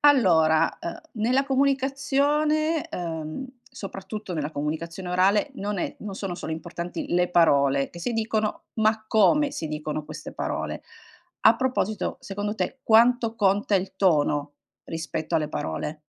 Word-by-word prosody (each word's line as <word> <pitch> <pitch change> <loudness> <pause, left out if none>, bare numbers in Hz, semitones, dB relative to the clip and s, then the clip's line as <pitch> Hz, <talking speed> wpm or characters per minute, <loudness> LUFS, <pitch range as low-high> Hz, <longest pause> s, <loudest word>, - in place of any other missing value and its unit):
Allora, 165 - +4
ehm, 170 - -6
nella 245 +5 +2
comunicazione, 280 +3 +1
ehm, 165 - -4 0.2
soprattutto 195 0 -7
nella 155 -3 -2
comunicazione 165 +5 -4
orale 195 +8 +3
non 205 -4 -3
è - - -2
non 205 -2 -6
sono 190 -2 -4
solo 175 -2 -6
importanti 170 +2 -5
le 180 0 +2
parole 140 -5 +3
che 170 - -10
si 240 - -2
dicono 220 -1 -1
ma 220 0 +1
come 280 +8 +4
si 160 - -4
dicono 150 0 -4
queste 155 0 -8
parole. - - -3 0.6
A 225 - +6
proposito 240 -5 -1
secondo 205 +1 -4
te, 260 +4 -3
quanto 230 0 +4
conta 205 -1 +2
il 190 0 0
tono 145 -5 +2 0.3
rispetto 160 0 -4
alle 155 -2 +1
parole? 150 - -4
195 Hz, 135 wpm, -25 LUFS, 160-230 Hz, 0.6 s, A